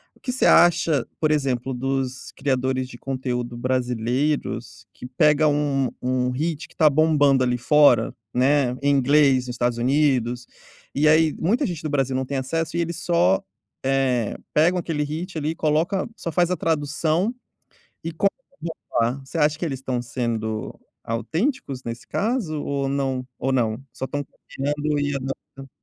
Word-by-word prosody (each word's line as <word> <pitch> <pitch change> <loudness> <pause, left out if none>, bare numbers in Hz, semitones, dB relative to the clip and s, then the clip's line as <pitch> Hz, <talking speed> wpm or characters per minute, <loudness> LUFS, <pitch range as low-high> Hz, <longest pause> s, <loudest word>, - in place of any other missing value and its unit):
o - - -25
que 250 - -3
você 260 - +1
acha, 170 -5 +4
por 155 - +2
exemplo, 130 -3 0
dos 130 0 -3
criadores 130 -1 0
de 120 - -10
conteúdo 125 -2 -3
brasileiros, 125 -2 -1
que - - -10
pega 150 +4 +3
um 145 -3 +1
um 125 0 0
hit 160 +4 -2
que - - -23
tá 155 - +5
bombando 145 -3 +4
ali 125 -1 +1
fora, 125 -3 +4 0.2
né, 135 0 +3
em 140 - +3
inglês, 135 -1 +4
nos 125 - -5
Estados 120 -1 0
Unidos, 125 -2 +1 0.5
e 150 +2 +3
aí, 155 0 +4
muita 230 - +1
gente 170 -4 -5
no 155 - -2
Brasil 135 -2 0
não 130 - -1
tem 140 +1 -3
acesso, 165 +5 -2
e 170 - +2
eles 170 0 -3
só, 95 - +3 0.4
eh, 130 -4 +1 0.2
pegam 175 +4 +4
aquele 160 -3 -2
hit 160 +4 -5
ali 150 0 -1
e - - -6
coloca 160 +6 0
só 170 - -4
faz 175 +1 +2
a 180 - 0
tradução, 160 - 0 0.7
e 165 - -3
copiam. 200 +5 +2 1.0
Você 165 - -6
acha 150 0 +3
que - - -3
eles 140 -5 -3
estão 125 -2 -2
sendo 115 -3 -3 0.3
autênticos 140 - -2
nesse 115 0 -6
caso 205 - -1
ou 140 -1 -1
não 135 -2 -1
ou 135 +1 -1
não? 115 -2 0
Só 125 +1 -4
estão 145 +1 -3
copiando 145 +3 -3
e 145 0 -1
adaptando? 135 0 -7
140 Hz, 165 wpm, -23 LUFS, 125-155 Hz, 1.0 s, tá